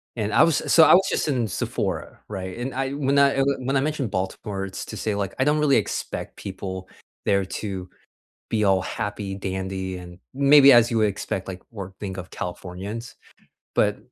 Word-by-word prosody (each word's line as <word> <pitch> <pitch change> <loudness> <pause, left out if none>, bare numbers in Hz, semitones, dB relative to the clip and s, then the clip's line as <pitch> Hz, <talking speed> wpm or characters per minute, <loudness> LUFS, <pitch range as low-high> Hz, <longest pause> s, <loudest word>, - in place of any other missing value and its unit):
and 110 -3 -2
I - - +7
was 165 -4 +3
so 165 - +8
I - - +7
was 190 +1 +5
just - - 0
in 125 -6 +1
Sephora, - - -3
right, 95 -1 -6
and 125 +2 -4
I 135 +1 -1
when 140 -1 +1
I, 140 -1 +5
eh, 135 - +3 0.2
when 130 +2 -1
I 135 - +3
mentioned 145 -7 -2
Baltimore, 95 +1 -3
it's 95 - -6
to - - -7
say, 105 -2 -1
like, 100 -2 -2
I 130 - +4
don't 150 +1 +2
really 145 -2 +4
expect 110 - -3
people 95 -1 -6 0.4
there 100 -1 +3 0.2
to 95 -3 -5 0.6
be 110 -2 +1
all 95 -2 +4
happy, 105 -3 -4
dandy, 95 -1 -4
and 90 0 -11 0.2
maybe 140 0 +7
as 120 -1 +6
you 115 - +1
would 110 -1 +4
expect, 95 -1 -4
like, 90 -1 -7
or 95 -4 -7
think 95 -2 -5
of 95 0 -8
Californians, 95 +7 -6 0.6
but, 105 -1 +2
105 Hz, 195 wpm, -24 LUFS, 95-135 Hz, 0.6 s, so